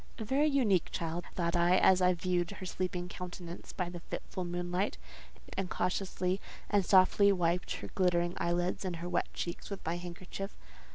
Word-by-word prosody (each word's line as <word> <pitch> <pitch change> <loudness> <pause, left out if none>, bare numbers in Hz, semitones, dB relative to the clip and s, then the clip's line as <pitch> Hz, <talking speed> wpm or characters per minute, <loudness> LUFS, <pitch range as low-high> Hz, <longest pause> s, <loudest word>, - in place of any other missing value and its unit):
"A 225 - -4
very 280 +7 +3
unique 235 - +3
child," 170 0 -3
thought 170 -1 0
I, 175 +1 +5
as 190 -1 +5
I 180 0 +5
viewed 175 -1 0
her 185 - -7
sleeping 180 -1 -2
countenance 180 -1 -7
by 180 -3 -2
the 175 0 -6
fitful 185 +2 -5
moonlight, 175 +2 -1 0.6
and 195 -2 -2
cautiously 185 0 -1 0.3
and 205 -1 +4
softly 195 +2 +6
wiped 175 -1 +1
her - - -6
glittering 175 -2 +2
eyelids 175 +2 0
and 185 -2 -2
her 170 +1 -5
wet 180 - 0
cheeks 170 - -4
with 200 -2 -6
my 165 +2 0
handkerchief. 180 +3 -7
180 Hz, 170 wpm, -32 LUFS, 175-190 Hz, 0.6 s, softly